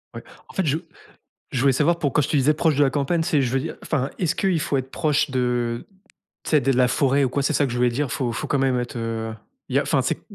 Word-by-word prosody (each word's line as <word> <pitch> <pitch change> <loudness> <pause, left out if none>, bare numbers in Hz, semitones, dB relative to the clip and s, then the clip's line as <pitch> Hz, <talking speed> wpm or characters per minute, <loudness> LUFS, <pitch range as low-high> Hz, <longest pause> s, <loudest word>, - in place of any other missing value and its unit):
Ouais. - - -7 0.2
En - - -14
fait, 190 - 0
je 150 +2 +1 0.8
je 125 - 0
voulais 135 0 +4
savoir 170 +5 +2
pour 140 -3 0
quand - - +3
je 140 - -2
te 155 - +1
disais 140 +2 +4
proche 160 0 +2
de 145 - +2
la 135 - +4
campagne, 145 +5 0
c'est 160 -3 +1
je 125 -3 0
veux 135 - +1
dire - - -5
enfin, 140 -3 -1
est-ce 175 -1 0
qu'il 190 -4 +1
faut 140 - -1
être 130 0 -3
proche 150 -2 +1
de 120 -2 -1 0.6
tu - - -5
sais 150 -2 +5
de 135 +2 +1
la 125 0 +4
forêt 140 +2 +2
ou 130 - 0
quoi? 140 +2 -1
C'est 150 +2 0
ça 145 - +3
que 120 - -5
je - - -3
voulais 125 0 +4
dire. 135 +2 -2
Faut 120 -3 -1
faut 120 - -4
quand 140 - 0
même 130 -2 +2
être, 120 0 -4
heu 115 -1 -3 0.4
il - - 0
y - - +6
a - - +2
enfin, - - +1
c'est - - -2
135 Hz, 295 wpm, -23 LUFS, 125-150 Hz, 0.8 s, y